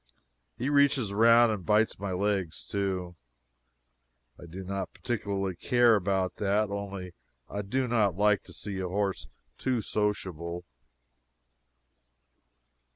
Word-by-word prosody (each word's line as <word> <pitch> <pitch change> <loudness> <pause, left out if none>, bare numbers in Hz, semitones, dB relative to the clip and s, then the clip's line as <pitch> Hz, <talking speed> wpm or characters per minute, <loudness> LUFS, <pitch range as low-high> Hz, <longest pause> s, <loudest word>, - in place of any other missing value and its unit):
He 125 - -2
reaches 140 -6 +3
around 115 +2 +6
and 105 -4 -3
bites 105 +3 +2
my 100 -1 -3
legs 95 -2 -1
too. 95 -3 -2 1.2
I 85 - -10
do 90 +3 -8
not 95 0 -3
care - - -20
particularly 100 -6 -2 0.4
about 95 -2 0
that, 105 +1 +1
only 100 -3 -5 0.3
I 100 - -4
do 130 +6 -1
not 110 -6 +2
like 105 0 +3
to - - -11
see 100 -2 -4
a 95 - -2
horse 95 -8 -2 0.3
too 125 -4 0
sociable. 90 -5 -2
100 Hz, 120 wpm, -29 LUFS, 95-105 Hz, 1.2 s, around